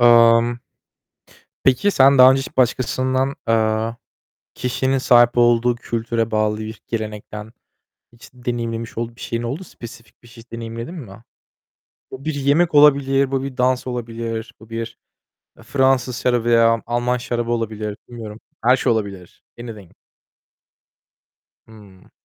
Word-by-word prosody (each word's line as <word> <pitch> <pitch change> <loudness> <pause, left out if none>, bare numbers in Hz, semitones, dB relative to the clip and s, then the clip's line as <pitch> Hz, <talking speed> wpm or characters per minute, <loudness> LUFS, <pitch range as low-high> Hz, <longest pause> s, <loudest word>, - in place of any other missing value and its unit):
Imm 120 0 +5 1.1
Peki 135 +11 +3
sen 135 -2 +5
daha 130 +1 +9
önce 135 - +1
hiç 135 - -8
başkasından, 130 +2 +1
eee, 110 0 +1 0.6
kişinin 130 +1 -1
sahip 120 -2 +5
olduğu 120 0 +4
kültüre 115 -1 -2
bağlı 110 0 0
bir 110 0 -7
gelenekten, 105 -1 -6 0.6
hiç 120 - -16
deneyimlemiş 115 -2 -4
olduğu 115 0 -4
bir - - -15
şeyin 115 0 -3
oldu, 135 +10 -4
spesifik 115 - -13
bir - - -16
şeyi 115 0 -14
deneyimledin 115 +5 -6
mi? 115 - -10 0.9
Bu 135 +2 -9
bir 155 - -1
yemek 150 +4 +2
olabilir. 140 -2 +4
Bu 135 -1 -1
bir 135 -2 -6
dans 125 0 +1
olabilir. 115 -2 -5
Bu 110 +1 -16
bir, 115 0 -5 0.6
eee, - - -16
Fransız 130 -3 +1
şarabı 120 -2 +1
veya 115 -1 +4
Alman 120 +1 0
şarabı 120 -1 -3
olabilir. 110 -2 -3
Bilmiyorum, 110 -2 -9 0.2
her 125 +2 +5
şey - - +1
olabilir. 100 -5 -6 0.2
Anything. 105 -7 -10 1.8
Hımm. 105 -4 -17
120 Hz, 130 wpm, -20 LUFS, 115-130 Hz, 1.8 s, daha